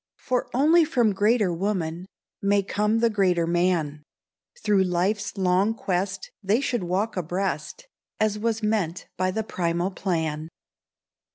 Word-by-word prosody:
For 250 -1 -1
only 310 +7 +5
from 245 -9 +2
greater 205 -1 +2
woman, 175 -2 -2 0.3
May 200 0 +2
come 210 +3 0
the 235 - +4
greater 185 -5 +2
man, 170 -4 0 0.6
Through 200 -2 +3
life's 190 +4 -1
long 190 +3 +2
quest 190 -2 -2
they 205 +4 +2
should 245 -6 -1
walk 195 +6 -1
abreast— 185 - -3 0.3
As 215 -1 +1
was 225 0 -1
meant 205 -6 -1
by 185 +1 0
the 220 +4 -2
primal 175 -2 -1
plan. 160 -5 -2
195 Hz, 130 wpm, -25 LUFS, 175-215 Hz, 0.6 s, only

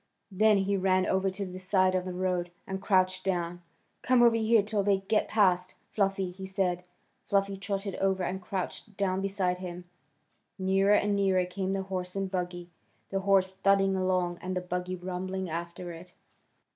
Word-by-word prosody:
Then 210 +2 +4
he 195 +1 +1
ran 185 0 +2
over 190 0 +1
to 195 +1 -4
the 185 0 -7
side 185 0 +2
of 185 -1 0
the 185 - -4
road, 180 -1 -1 0.2
and 190 0 -5
crouched 185 -2 +2
down. 175 -2 -2 0.4
"Come 255 -1 +4
over 235 -1 +6
here 225 -1 +4
till 210 0 0
they 195 -1 +2
get 210 +2 +1
past, 185 -4 +2 0.2
Fluffy," 195 -2 0
he 190 +1 -8
said. 185 -2 -1 0.4
Fluffy 200 0 +1
trotted 195 0 -3
over 190 -1 +1
and 190 +2 -3
crouched 190 +2 -5
down 190 -1 0
beside 190 -2 -1
him. 180 -1 -7 0.7
Nearer 195 +1 +3
and 205 0 +2
nearer 190 -2 +2
came 190 +1 -3
the 195 0 -1
horse 185 -1 -5
and 195 -1 -2
buggy, 175 -1 -4 0.4
the 195 - -1
horse 190 -1 +3
thudding 195 0 +2
along 185 -2 0
and 185 0 -3
the - - -1
buggy 180 0 -3
rumbling 185 0 -4
after 170 +1 -5
it. 170 +2 -12
190 Hz, 175 wpm, -29 LUFS, 180-195 Hz, 0.7 s, over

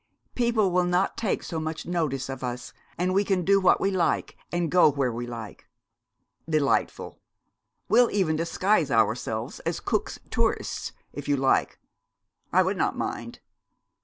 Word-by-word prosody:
People 235 -5 +2
will 180 0 +2
not 180 +2 +1
take 220 -4 -1
so 165 - -4
much 160 0 -4
notice 155 -7 -1
of 135 -1 -6
us, 125 0 -5 0.2
and 180 +1 0
we 200 +2 +3
can 190 -3 0
do 195 0 +5
what 185 - +4
we 195 - +1
like, 180 -3 0 0.2
and 175 -3 -1
go 180 -3 +6
where 135 -3 0
we 120 +1 -5
like.' 115 -3 -8 0.8
'Delightful! 150 -3 0 0.7
We'll 240 +1 +5
even 185 -6 +1
disguise 170 +1 +1
ourselves 115 0 0
as - - -3
Cook's - - -2
tourists, - - -1 0.2
if 145 - -7
you 145 -1 +2
like. 135 0 +1 0.7
I - - +5
would - - -1
not - - 0
mind.' - - -5
165 Hz, 155 wpm, -26 LUFS, 135-185 Hz, 0.8 s, go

